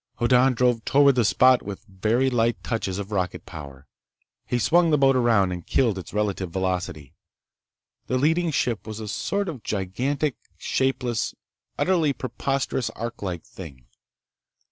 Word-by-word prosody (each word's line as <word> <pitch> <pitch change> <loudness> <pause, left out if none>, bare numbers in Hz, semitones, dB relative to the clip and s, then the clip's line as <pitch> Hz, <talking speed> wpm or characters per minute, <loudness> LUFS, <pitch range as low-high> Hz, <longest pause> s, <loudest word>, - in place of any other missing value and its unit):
Hoddan 125 +2 +4
drove 120 -2 +2
toward 140 0 +5
the 125 -2 +2
spot 130 +4 +5
with 100 +1 -8
very 110 +6 0
light 115 -1 +1
touches 105 -5 -2
of 100 0 -6
rocket 90 -4 -2
power. 70 -2 -10 0.6
He 125 - 0
swung 170 +7 +3
the 150 - +4
boat 135 -1 +4
around 115 -7 +3
and 90 -1 -5
killed 115 -3 +1
its 90 - -9
relative 100 -3 -1
velocity. 90 -6 -3 0.9
The 130 - 0
leading 165 +5 +2
ship 120 -7 -1
was 110 0 -6
a 110 - -6
sort 200 - -2
of 150 -9 -5
gigantic, 120 +9 -2 0.2
shapeless, 125 -3 -1 0.4
utterly 165 -6 +2
preposterous 130 0 -2
ark 115 +1 -6
like 90 -4 -4
thing. 70 -9 -11
115 Hz, 145 wpm, -24 LUFS, 95-135 Hz, 0.9 s, toward